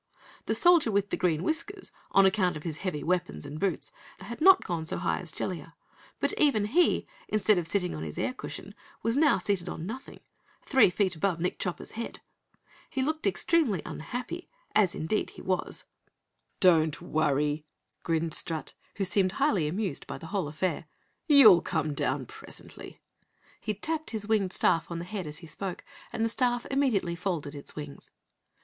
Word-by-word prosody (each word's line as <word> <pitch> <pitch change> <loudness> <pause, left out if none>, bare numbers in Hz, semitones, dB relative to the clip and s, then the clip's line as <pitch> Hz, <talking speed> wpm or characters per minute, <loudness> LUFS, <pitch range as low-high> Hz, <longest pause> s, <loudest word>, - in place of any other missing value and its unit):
The - - +1
Soldier 345 -8 +5
with 200 0 +1
Green 165 -2 +1
Whiskers, 335 +5 -2 0.2
on 195 - +5
account 190 -3 +2
of 150 - -10
his 160 -3 -4
heavy 170 -5 -3
weapons 180 -2 -1
and 145 +2 -6
boots, 190 -4 -1 0.3
had 230 +7 -8
not 380 +2 +7
gone 170 -2 -2
so 160 - -3
high 175 - 0
as 175 -4 -6
Jellia, 165 -2 -5 0.4
but - - +1
even 245 -9 +4
he, 330 +12 +3 0.2
instead 215 -2 +3
of 165 - -4
sitting 180 0 0
on 75 - -5
his 80 -2 -6
air - - -1
cushion, - - -8 0.3
was 230 +2 +1
now 295 0 +5
seated 185 -2 -1
on 160 - -5
nothing 230 +7 -8 0.4
three 265 -8 +6
feet 185 0 0
above 170 +1 0
Nick 180 +2 -2
Chopper's 180 -3 -3
head. 230 +1 -6 0.7
He 265 - -1
looked 310 -4 -1
extremely 205 - +1
unhappy, 250 - -5 0.2
as 195 -5 +3
indeed 160 +7 -1
he - - -12
was. 185 -1 -2 0.8
"Don't 160 -4 +4
worry," 150 0 0 0.3
grinned 165 -1 0
Strut, 160 -2 -4 0.2
who 200 - -1
seemed 185 0 +2
highly 210 - +2
amused 185 -2 -3
by - - -5
the 160 - -10
whole 190 -7 0
affair, 160 +2 -2 0.4
"you'll 240 - +9
come 155 -2 -1
down 130 -1 -1
presently." - - -11 0.6
He 215 - -3
tapped 315 +9 -3
his 215 -3 -4
winged 210 -4 +2
staff 165 -3 +2
on 170 - -4
the 170 - -5
head 185 -2 -5
as 150 0 -7
he 170 - -10
spoke, 185 +3 -5 0.3
and 225 -1 0
the - - +1
staff 245 0 0
immediately 240 -11 +1
folded 170 -5 -3
its 145 -1 -7
wings. 145 -2 -8
185 Hz, 175 wpm, -29 LUFS, 160-225 Hz, 0.8 s, you'll